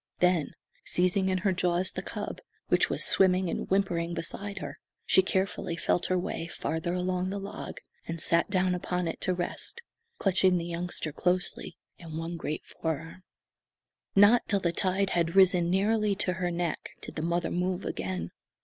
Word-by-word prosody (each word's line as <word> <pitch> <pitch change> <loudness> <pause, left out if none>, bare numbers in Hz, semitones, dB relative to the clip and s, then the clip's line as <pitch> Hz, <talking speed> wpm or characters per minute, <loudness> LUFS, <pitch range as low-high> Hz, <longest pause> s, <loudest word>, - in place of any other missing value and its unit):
Then, 180 -4 +2 0.3
seizing 185 +2 +2
in 185 - +1
her 195 - +4
jaws 180 0 +1
the - - -4
cub, - - -6 0.3
which - - +3
was - - +2
swimming 185 -2 +4
and - - -4
whimpering 175 -3 +1
beside 200 +5 -5
her, - - -6 0.3
she - - +5
carefully 190 -2 -1
felt 175 - +1
her 185 - +1
way 175 -2 -3
farther 160 +2 -2
along 180 0 -1
the 200 - -3
log, 195 0 -6 0.3
and 165 0 -4
sat 170 +3 +3
down 185 -1 +2
upon 180 0 -2
it 165 - -4
to 185 - +1
rest, 180 - -2 0.3
clutching 185 -1 +3
the 170 - -3
youngster 170 -2 -3
closely 180 +4 -1 0.2
in 160 -2 -7
one 165 +1 -4
great 155 -2 -4
fore 160 -2 -2
arm. 165 +4 -11 0.9
Not 205 +4 +6
till 200 - +2
the 170 -3 0
tide 190 +2 +1
had 170 0 0
risen 180 -3 +5
nearly 205 +2 +2
to 185 -2 0
her 180 0 -1
neck 170 -1 -3
did - - -8
the 155 - -2
mother 170 +1 0
move 180 +1 -1
again. 90 -2 -3
180 Hz, 175 wpm, -29 LUFS, 170-190 Hz, 0.9 s, Not